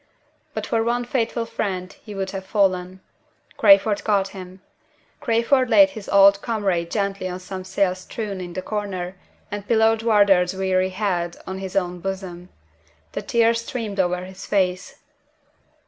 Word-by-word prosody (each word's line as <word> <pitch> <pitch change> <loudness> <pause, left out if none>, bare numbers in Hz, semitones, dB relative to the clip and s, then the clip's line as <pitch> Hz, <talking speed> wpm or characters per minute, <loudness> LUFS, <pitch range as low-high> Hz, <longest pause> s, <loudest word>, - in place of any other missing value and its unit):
But - - -3
for 225 -1 0
one 240 +1 0
faithful 235 -2 -1
friend 185 -4 -4
he 210 -2 -9
would 190 -1 -3
have 195 -1 -5
fallen. 185 -2 0 0.6
Crayford 205 0 +5
caught 200 -2 +1
him. 185 -1 -10 0.6
Crayford 255 0 +2
laid 295 +1 +6
his 215 -6 -9
old 200 0 +6
comrade 195 -7 -1
gently 200 -1 -2
on 180 0 -5
some 185 0 -7
sails 190 0 0
strewn 200 0 -5
in 175 -1 -7
a 185 - -3
corner, 195 -4 -4 0.4
and 205 0 -5
pillowed 225 -1 +3
Wardour's 200 -5 +4
weary 185 -1 +1
head 185 -3 -2
on 190 0 -5
his 190 -1 -6
own 180 -2 -1
bosom. 185 -1 -6 0.6
The - - -4
tears 230 -1 +2
streamed 225 -5 -5
over 180 0 0
his 190 +1 -10
face. 185 -2 0
195 Hz, 150 wpm, -22 LUFS, 185-220 Hz, 0.6 s, laid